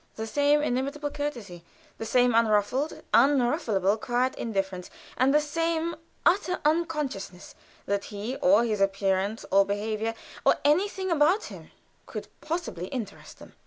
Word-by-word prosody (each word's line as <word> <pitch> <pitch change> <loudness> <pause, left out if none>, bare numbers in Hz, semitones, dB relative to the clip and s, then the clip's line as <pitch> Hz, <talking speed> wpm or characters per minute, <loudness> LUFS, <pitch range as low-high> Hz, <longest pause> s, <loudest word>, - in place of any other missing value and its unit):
The 220 - -4
same 290 +5 +2
inimitable 285 +3 -2
courtesy, 235 - -5 0.4
the 225 - -4
same 245 +1 +3
unruffled, 230 +6 +1
unrufflable 240 - +3
quiet 250 +1 0
indifference, 195 -5 -3 0.3
and 255 +3 +3
the 300 - +5
same 330 +2 -1 0.3
utter 360 0 +2
unconsciousness 300 - -2 0.3
that 200 0 -1
he, 215 +5 -5
or 200 +5 +4
his 215 -3 -1
appearance, 195 +1 0
or 195 +1 +6
behavior, 215 +3 -2 0.3
or - - +5
anything 375 +5 +1
about 335 +6 +3
him, - - -12 0.4
could - - -7
possibly 310 - -4
interest 240 -3 -7
them. - - -14
245 Hz, 130 wpm, -27 LUFS, 205-295 Hz, 0.4 s, or